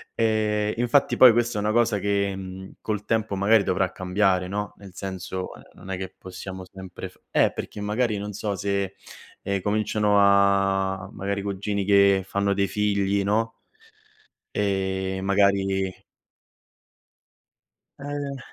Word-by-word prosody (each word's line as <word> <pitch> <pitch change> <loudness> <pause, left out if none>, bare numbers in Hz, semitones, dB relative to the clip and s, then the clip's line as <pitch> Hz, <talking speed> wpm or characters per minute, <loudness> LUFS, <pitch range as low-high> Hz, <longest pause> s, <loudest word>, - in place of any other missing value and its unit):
E 110 -1 +1
infatti 120 +4 +2
poi 125 - +9
questa 120 -1 0
è - - 0
una 105 +1 +1
cosa 115 -3 +2
che, 100 0 0
mhmm, 95 0 -8
col 105 -2 -3
tempo 110 -2 0
magari 100 +2 +4
dovrà 95 -1 0
cambiare, 95 0 +1
no, 105 +1 -4
nel 100 -2 -12
senso, 95 -1 -5
ehm, - - -14
non 95 - -13
è 95 - -2
che 95 0 -6
possiamo 95 0 -8
sempre 95 -1 -9
f - - -24
eh, - - +3
perché 105 - -7
magari 105 +1 0
non 105 +1 -5
so 105 0 -3
se, 100 0 -2 0.5
ehm, 100 -1 -2
cominciano 105 0 +1
a 100 -1 +3
magari 100 +1 -3
cugini 100 0 -2
che 100 -1 +5
fanno 100 +1 0
dei 100 0 +1
figli, 100 0 +1
no, 110 +3 0 0.9
e 95 -1 -1
magari 95 -1 +1 2.0
Eh. 140 -1 -4
100 Hz, 140 wpm, -25 LUFS, 95-105 Hz, 2.0 s, poi